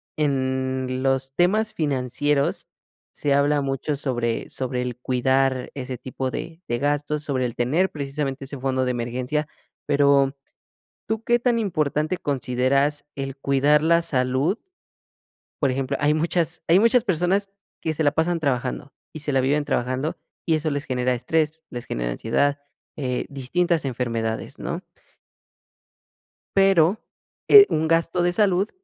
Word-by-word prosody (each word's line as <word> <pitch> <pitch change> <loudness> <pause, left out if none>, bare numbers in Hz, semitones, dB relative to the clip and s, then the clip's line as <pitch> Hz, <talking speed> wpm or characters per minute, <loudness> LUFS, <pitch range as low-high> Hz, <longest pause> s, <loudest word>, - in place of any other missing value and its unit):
en 130 -2 -1
los 135 0 0
temas 215 +7 +2
financieros 145 - 0 0.5
se 145 - 0
habla 145 +1 +3
mucho 135 +2 -2
sobre 120 -5 -2
sobre 125 -1 -3
el 125 -1 -4
cuidar 130 +1 0
ese 130 -2 -5
tipo 130 +1 -4
de 165 +6 -6
de 120 - -1
gastos, 145 +2 -1
sobre 130 -4 -1
el 115 - -8
tener 155 +11 +1
precisamente 140 -1 -4
ese 140 0 -5
fondo 130 0 0
de 125 - 0
emergencia, 125 +5 -2 0.4
pero, 140 -1 +3 0.7
¿tú 220 +1 -2
qué 240 +1 +3
tan 240 -1 +2
importante 155 -5 0
consideras 140 +2 0
el 135 -1 -4
cuidar 140 +2 +3
la 170 +2 +3
salud. 130 - 0 1.0
Por 140 - +3
ejemplo, 135 +1 -2
hay 150 +1 +3
muchas 165 +1 0
hay 170 +3 +6
muchas 230 +2 +4
personas 190 0 +1 0.3
que 160 - -1
se 155 - -1
la 145 - +4
pasan 165 +3 0
trabajando 135 -1 -2 0.2
y 155 - -6
se 150 0 -2
la 135 -1 +2
viven 145 +3 +1
trabajando 130 +5 -1 0.3
y 165 - +3
eso 155 0 -1
les 145 +1 -3
genera 125 0 0
estrés, 155 +5 -1
les 120 0 -7
genera - - -3
ansiedad, 145 - 0 0.4
eh, 125 -4 -2
distintas 160 +5 0
enfermedades, 115 -3 -3
¿no? - - -4 1.7
Pero, 195 -1 +4 0.5
eh, 415 -1 +11
un 160 +1 0
gasto 165 +2 +1
de 175 0 +2
salud, 195 +1 +2
140 Hz, 145 wpm, -23 LUFS, 130-160 Hz, 1.7 s, eh